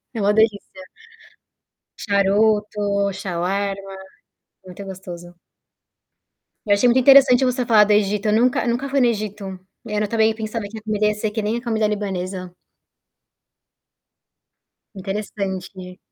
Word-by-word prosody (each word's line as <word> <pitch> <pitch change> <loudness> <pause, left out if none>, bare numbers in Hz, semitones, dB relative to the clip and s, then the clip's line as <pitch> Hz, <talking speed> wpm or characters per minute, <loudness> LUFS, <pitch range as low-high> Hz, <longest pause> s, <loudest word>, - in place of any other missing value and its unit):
É 230 - -5
uma 205 +1 +2
delícia. 220 -1 +3 1.5
Charuto, 210 +1 +1 0.4
Xauarma, 195 +2 -3 0.7
muito 185 +2 -10
gostoso. 175 -2 -10 1.3
Eu 205 - +4
achei 225 +5 +3
muito 240 +2 +4
interessante 270 -1 +6
você 250 0 0
falar 220 -3 +5
do 210 - +1
Egito, 210 0 +1
eu - - +2
nunca 250 +5 +2
nunca 245 +4 -1
fui 275 0 0
no 250 - +4
Egito. 210 -4 -4 0.3
É, 210 -1 -2
eu 210 - -2
também 220 0 +2
pensava, 220 0 -5
que 220 +2 -9
a - - -13
comida 215 -1 0
ia 210 - +1
ser 210 +1 -3
que 220 +1 -3
nem 215 +2 -1
a 235 - -5
comida 220 -3 0
libanesa. 190 -3 -4 2.4
Interessante. 190 -2 -6
210 Hz, 135 wpm, -21 LUFS, 195-225 Hz, 2.4 s, interessante